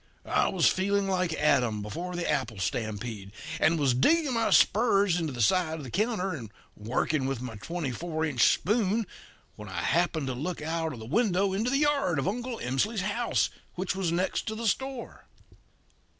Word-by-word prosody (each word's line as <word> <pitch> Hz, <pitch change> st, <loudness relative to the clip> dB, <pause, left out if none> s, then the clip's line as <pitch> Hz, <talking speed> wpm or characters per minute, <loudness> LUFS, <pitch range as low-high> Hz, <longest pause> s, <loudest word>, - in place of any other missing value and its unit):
I -, -, +2 dB
was -, -, +3 dB
feeling 200 Hz, +1 st, +1 dB
like 185 Hz, -2 st, 0 dB
Adam 125 Hz, -9 st, +2 dB
before 175 Hz, +12 st, -5 dB
the 175 Hz, -1 st, -2 dB
apple 135 Hz, -7 st, -1 dB
stampede, 105 Hz, +1 st, -3 dB, 0.3 s
and 160 Hz, +1 st, +3 dB
was 135 Hz, -4 st, +3 dB
digging 295 Hz, -, +3 dB
my 230 Hz, -1 st, +1 dB
spurs 200 Hz, -5 st, +4 dB
into 160 Hz, -3 st, -2 dB
the 120 Hz, -3 st, -1 dB
side 175 Hz, -, +2 dB
of 155 Hz, -, -7 dB
the 130 Hz, -, -8 dB
counter 210 Hz, -2 st, 0 dB
and 115 Hz, -9 st, -7 dB, 0.2 s
working 130 Hz, +6 st, -1 dB
with 135 Hz, -3 st, -2 dB
my 125 Hz, -1 st, -6 dB
twenty 165 Hz, -, -4 dB
four 160 Hz, +4 st, -2 dB
inch 135 Hz, -7 st, +4 dB
spoon 215 Hz, +2 st, +1 dB, 0.5 s
when 105 Hz, -2 st, -9 dB
I 90 Hz, -2 st, -3 dB
happened 165 Hz, -2 st, +1 dB
to 130 Hz, -, -2 dB
look 155 Hz, +8 st, -4 dB
out 160 Hz, +1 st, -2 dB
of -, -, -8 dB
the 110 Hz, -, -8 dB
window 195 Hz, -, +1 dB
into 220 Hz, +5 st, 0 dB
the 275 Hz, -, +2 dB
yard 280 Hz, -, +2 dB
of 135 Hz, -, -1 dB
Uncle 240 Hz, +3 st, -3 dB
Emsley's 185 Hz, -, -1 dB
house, 215 Hz, +5 st, 0 dB, 0.2 s
which 185 Hz, +1 st, -2 dB
was 190 Hz, -3 st, -1 dB
next 180 Hz, +2 st, -1 dB
to 220 Hz, -, -2 dB
the 230 Hz, +1 st, -5 dB
store. 265 Hz, +3 st, -3 dB
170 Hz, 185 wpm, -28 LUFS, 130-205 Hz, 0.5 s, spurs